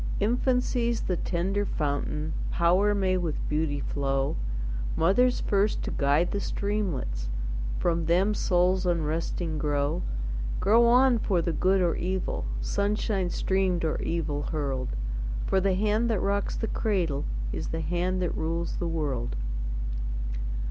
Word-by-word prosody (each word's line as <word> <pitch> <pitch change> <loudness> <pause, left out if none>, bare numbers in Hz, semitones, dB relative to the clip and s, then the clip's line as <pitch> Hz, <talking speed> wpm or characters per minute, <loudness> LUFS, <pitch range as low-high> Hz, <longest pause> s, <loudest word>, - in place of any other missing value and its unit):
Infancy's 240 +1 +1
the 185 - 0
tender 190 +4 0
fountain, 150 -2 -2 0.2
Power 185 +5 +3
may 190 -2 +2
with 170 -4 -2
beauty 150 -1 0
flow, 135 -1 0 0.6
Mother's 245 +10 +3
first 205 +1 +1
to - - -3
guide 145 +5 +2
the 200 - -1
streamlets, 175 - -2 0.5
From 170 -2 0
them 185 +5 +3
souls 185 -1 +2
unresting 165 -1 -1
grow 145 - 0 0.6
Grow 230 +4 +5
on 250 0 +5
for 190 -4 +1
the 170 0 0
good 185 +4 +3
or 175 -2 +2
evil, 185 - -2 0.2
Sunshine 200 - 0
streamed 185 -2 +1
or 155 - -1
evil 155 -3 -1
hurled; 140 - -2 0.5
For 190 - +2
the 190 -1 +2
hand 215 +4 +2
that 220 -4 +1
rocks 200 +1 0
the - - -2
cradle 180 -12 0 0.3
Is - - -3
the 165 - -2
hand 180 +3 0
that 175 - -1
rules 165 +1 -2
the 175 - -1
world. 145 - -2
175 Hz, 135 wpm, -28 LUFS, 155-200 Hz, 0.6 s, Grow